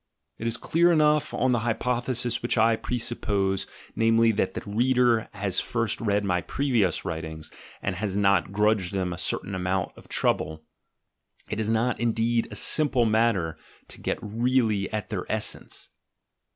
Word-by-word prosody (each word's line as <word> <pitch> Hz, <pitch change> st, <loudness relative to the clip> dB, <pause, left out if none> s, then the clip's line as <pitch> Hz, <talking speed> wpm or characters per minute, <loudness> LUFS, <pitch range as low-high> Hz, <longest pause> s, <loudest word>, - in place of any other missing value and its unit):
It 115 Hz, -, -3 dB
is 115 Hz, -, 0 dB
clear 170 Hz, +2 st, +3 dB
enough, 150 Hz, -2 st, +3 dB
on 130 Hz, -, +1 dB
the 120 Hz, -, +2 dB
hypothesis 120 Hz, +1 st, -1 dB
which 120 Hz, -, -1 dB
I 115 Hz, +1 st, +4 dB
presuppose, 105 Hz, -5 st, -1 dB, 0.3 s
namely, 115 Hz, +1 st, +4 dB
that 95 Hz, -3 st, -1 dB
the -, -, -3 dB
reader 120 Hz, +1 st, +2 dB
has 100 Hz, -3 st, -1 dB
first 115 Hz, -2 st, -1 dB
read 105 Hz, -2 st, +1 dB
my 90 Hz, -2 st, +1 dB
previous 120 Hz, -, 0 dB
writings 80 Hz, -1 st, -5 dB, 0.3 s
and 95 Hz, -2 st, -2 dB
has 100 Hz, 0 st, -2 dB
not 100 Hz, -3 st, +3 dB
grudged 105 Hz, -2 st, +1 dB
them 90 Hz, -2 st, -1 dB
a 90 Hz, -, -6 dB
certain 100 Hz, -, 0 dB
amount 95 Hz, 0 st, -1 dB
of -, -, -15 dB
trouble: 80 Hz, +1 st, 0 dB, 0.9 s
it 110 Hz, -, -2 dB
is 110 Hz, 0 st, -1 dB
not, 115 Hz, +2 st, +1 dB
indeed, 115 Hz, 0 st, +1 dB
a -, -, -8 dB
simple 135 Hz, -6 st, +2 dB
matter 110 Hz, -7 st, +1 dB, 0.3 s
to -, -, -11 dB
get -, -, -1 dB
really 110 Hz, -2 st, +1 dB
at 105 Hz, -2 st, -3 dB
their -, -, -4 dB
essence. -, -, -3 dB
110 Hz, 155 wpm, -26 LUFS, 95-120 Hz, 0.9 s, I